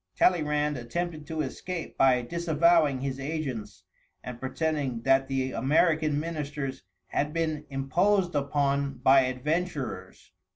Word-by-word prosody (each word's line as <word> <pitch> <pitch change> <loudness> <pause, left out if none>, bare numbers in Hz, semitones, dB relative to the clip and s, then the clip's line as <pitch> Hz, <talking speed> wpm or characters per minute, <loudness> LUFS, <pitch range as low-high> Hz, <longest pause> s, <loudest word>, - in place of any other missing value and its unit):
Talleyrand 150 -4 +2
attempted 155 +5 -4
to 160 -1 -2
escape 170 +5 -5
by 130 -2 +4
disavowing 165 -2 +2
his 135 0 -3
agents, 130 - -4 0.4
and 125 -1 -7
pretending 135 -3 -2
that 135 +1 +3
the 130 -1 -1
American 155 +1 +2
ministers 150 -4 -4 0.3
had 150 +1 -1
been 155 -2 -1
imposed 175 +8 +1
upon 140 -1 0
by 135 +1 +7
adventurers. 135 - -3
145 Hz, 115 wpm, -28 LUFS, 135-160 Hz, 0.4 s, by